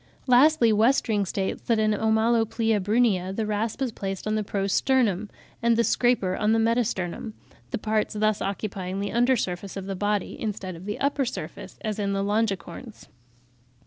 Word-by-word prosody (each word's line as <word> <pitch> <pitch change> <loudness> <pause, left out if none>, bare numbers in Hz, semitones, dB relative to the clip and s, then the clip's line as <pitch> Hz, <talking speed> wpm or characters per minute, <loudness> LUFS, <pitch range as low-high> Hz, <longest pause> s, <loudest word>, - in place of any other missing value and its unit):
Lastly, 250 -2 +5
Westring 215 -2 +2
states 190 +2 -2
that 230 - +1
in 215 0 +2
Omaloplia 225 0 +1
brunnea 205 -3 +2
the 220 - -1
rasp 215 +4 -2
is 255 - -1
placed 195 -3 -5
on 215 - 0
the 215 0 0
pro 200 -1 -2
sternum, 215 -2 +1 0.3
and 230 0 +3
the 235 - +4
scraper 235 -7 +2
on 215 +2 +1
the - - +3
meta 230 +2 +3
sternum, 200 +1 -4 0.3
the - - -2
parts 215 0 -1
thus 215 0 +1
occupying 195 -1 -3
the 200 0 -2
under 245 +2 +3
surface 190 -2 -4
of 195 - -5
the 195 0 -4
body, 205 +1 -1
instead 195 -4 -4
of 170 +3 -11
the 210 +1 -4
upper 280 0 +1
surface 255 - -6
as 215 -4 -3
in 200 -1 0
the 195 0 0
Longicorns. 205 +1 -3
215 Hz, 175 wpm, -25 LUFS, 195-230 Hz, 0.3 s, Lastly